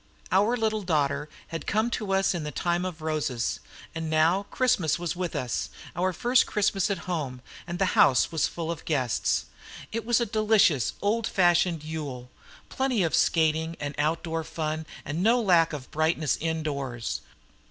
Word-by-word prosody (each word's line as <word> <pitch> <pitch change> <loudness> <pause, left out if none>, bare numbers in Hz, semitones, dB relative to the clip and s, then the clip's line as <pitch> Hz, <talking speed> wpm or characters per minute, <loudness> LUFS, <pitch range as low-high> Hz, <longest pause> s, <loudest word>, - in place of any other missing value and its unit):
Our 210 +6 +3
little 220 -2 0
daughter 150 -4 0 0.2
had 165 -3 -6
come 220 +3 +1
to 210 -4 -2
us 195 0 +2
in 170 -3 -3
the 150 - -3
time 175 +5 -1
of 170 -4 -6
roses; 150 -7 -1 0.3
and 160 -1 -4
now 165 +6 +2
Christmas 245 - +2
was 175 0 -3
with 180 -1 -3
us, 125 -2 -2 0.3
our 185 +1 +1
first 245 +7 +3
Christmas 205 -1 +1
at 200 - 0
home, 150 -8 -3 0.3
and 175 0 -4
the 190 0 +1
house 130 +4 +5
was 160 -2 +1
full 165 -1 -4
of 165 - -6
guests. 130 -7 0 0.5
It 230 +1 -3
was 240 0 +2
a 235 - +1
delicious 215 - +3
old 220 +2 +1
fashioned 175 -3 +2
Yule; 140 -6 -6 0.4
plenty 260 -6 0
of 165 - 0
skating 160 0 +2
and 145 0 -4
outdoor 165 +2 -1
fun, 155 0 -4 0.2
and 155 +4 -3
no 230 +5 +4
lack 175 -7 +4
of 145 -4 -7
brightness 155 -1 +1
indoors. 140 -7 -3
165 Hz, 165 wpm, -27 LUFS, 155-195 Hz, 0.5 s, house